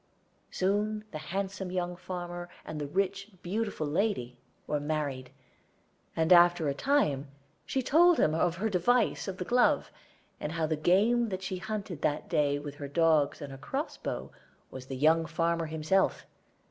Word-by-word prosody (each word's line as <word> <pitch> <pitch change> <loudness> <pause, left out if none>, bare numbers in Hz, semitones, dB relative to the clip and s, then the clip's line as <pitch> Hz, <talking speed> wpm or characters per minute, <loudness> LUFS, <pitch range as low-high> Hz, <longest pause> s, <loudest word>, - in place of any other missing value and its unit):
Soon 210 +3 0
the 155 - -5
handsome 190 +3 -4
young 180 -1 -2
farmer 175 -1 -6 0.2
and 155 -1 -5
the 145 - -3
rich 195 +4 -1
and 190 -5 -24
beautiful 205 -3 -2
lady 145 - -1 0.3
were 150 - -1
married, 145 -4 -3 0.9
and 160 +2 +4
after 175 -2 +6
a 140 - +1
time 150 - +1 0.4
she 265 - -1
told 335 +6 +5
him 155 - +3
of 165 +1 +1
her 205 +6 -1
device 220 +5 +1
of 190 -1 -4
the 180 - -4
glove, 245 +3 +2 0.5
and 150 - -4
how 165 -1 0
the 155 0 0
game 210 +9 +3
that 190 -1 -4
she 185 0 -3
hunted 200 -5 -5
that 150 0 -1
day 145 -1 +2
with 145 0 -6
her 145 - -5
dogs 155 -1 +2
and 140 - -7
her 135 - -9
cross 275 - -3
bow - - -5 0.4
was 130 0 -9
the 135 - -5
young 160 +3 +3
farmer 165 +1 0
himself. 160 +5 +1
175 Hz, 170 wpm, -30 LUFS, 150-200 Hz, 0.9 s, after